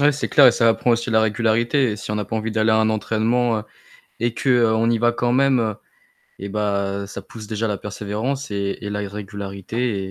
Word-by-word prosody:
Ouais, 145 +1 +5
c'est 145 - -3
clair 145 -3 +7
et 125 - +7
ça 115 0 +3
apprend 115 +2 +2
aussi 115 +1 -1
la 110 -1 +4
régularité 115 +4 +1
et 105 - -4
si 105 - -6
on - - -1
n'a 105 0 -2
pas 110 - -4
envie 110 0 -3
d'aller 110 0 +2
à 110 - +4
un 110 0 +3
entraînement 110 +1 0 0.6
et 120 0 0
qu'on 115 -3 +2
y 115 - +2
va 120 +1 +3
quand 120 0 -1
même, 125 -5 +2 0.6
eh 100 - -6
bah, 100 -1 -1
ça 100 - -7
pousse 110 +2 -11
déjà 110 +2 -2
à - - -1
la 105 - -1
persévérance 105 +8 -4
et 100 -1 -2
et 105 - -5
la 105 0 -3
régularité 100 +1 -4
110 Hz, 220 wpm, -21 LUFS, 105-120 Hz, 0.6 s, clair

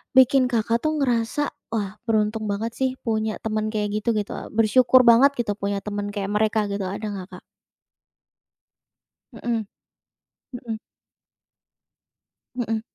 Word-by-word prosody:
bikin 260 0 +6
Kakak 230 0 +1
tuh 310 0 0
ngerasa, 245 +2 0 0.2
"Wah, 210 -3 -3
beruntung 215 0 +1
banget 225 +3 -2
sih, 265 0 +1 0.2
punya 220 -1 -1
teman 215 -1 -1
kayak 210 0 -1
gitu," 235 +2 +1
gitu. 210 -1 -2 0.2
Bersyukur 245 +4 +5
banget 250 +4 +7
gitu, 230 -4 0
punya 200 0 -2
teman 205 -1 -3
kayak 200 -1 -3
mereka 215 0 +2
gitu. 200 -1 -2
Ada 200 +3 -5
nggak, 185 -2 -6
Kak? - - -16 1.9
Mhm. 230 -3 -3 0.9
Mhm. 235 -3 -5 1.8
Mhm. 225 -3 -1
220 Hz, 125 wpm, -24 LUFS, 210-240 Hz, 1.9 s, banget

